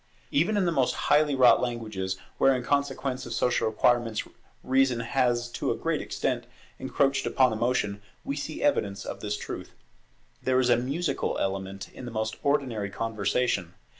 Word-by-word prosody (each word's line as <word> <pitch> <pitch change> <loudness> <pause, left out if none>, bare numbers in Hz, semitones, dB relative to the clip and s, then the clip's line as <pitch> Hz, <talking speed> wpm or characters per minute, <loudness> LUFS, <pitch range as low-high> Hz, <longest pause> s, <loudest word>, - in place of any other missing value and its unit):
Even 175 +9 +2
in 195 - +2
the 170 - +2
most 135 -6 +1
highly 150 -1 +3
wrought 130 -2 +6
languages, 110 -6 -3 0.2
where, 135 -1 +5
in 125 - -3
consequence 135 -2 -1
of - - -5
social 125 -2 +1
requirements, 115 0 +2 0.4
reason 130 -2 +2
has 120 0 +1
to - - -2
a - - 0
great - - -1
extent - - -2 0.3
encroached 140 0 +1
upon 130 -3 +3
emotion, 110 -3 0 0.2
we 140 - -3
see 150 - -5
evidence 100 - +1
of - - -5
this 105 0 -3
truth. - - -7 0.7
There 130 0 +2
is 125 -1 +3
a - - +7
musical 140 +8 -1
element 95 0 -3
in 130 - -9
the 120 - -6
most 110 0 -2
ordinary 130 -8 0
conversation. 110 -3 -1
125 Hz, 165 wpm, -27 LUFS, 110-135 Hz, 0.7 s, a